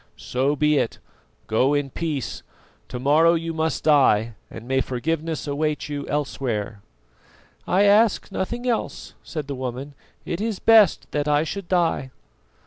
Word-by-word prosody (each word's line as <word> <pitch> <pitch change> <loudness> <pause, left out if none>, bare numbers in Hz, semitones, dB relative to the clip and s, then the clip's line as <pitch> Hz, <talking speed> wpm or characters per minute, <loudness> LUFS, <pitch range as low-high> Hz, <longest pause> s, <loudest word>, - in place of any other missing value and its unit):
So 135 +4 -1
be 150 0 +2
it. - - -2 0.5
Go 130 +6 +2
in 145 -2 -1
peace. 155 -4 -3 0.5
To 125 - -6
morrow 155 +6 +4
you 165 0 -3
must 160 0 -1
die, 120 -7 +4 0.2
and 115 - -10
may 135 0 +1
forgiveness 160 +5 -2
await 150 +1 -2
you 145 -1 -4
elsewhere." 120 -8 -3 0.9
"I 190 +3 +3
ask 205 +1 +3
nothing 240 +6 -3
else," 235 -2 -2
said 155 -4 -6
the 140 - -4
woman. 130 +2 -5 0.3
"It 170 - -3
is 220 -2 -2
best 220 -5 +5
that 150 0 -1
I 150 0 +3
should 190 +3 -5
die." 170 -7 +1
150 Hz, 145 wpm, -23 LUFS, 135-165 Hz, 0.9 s, best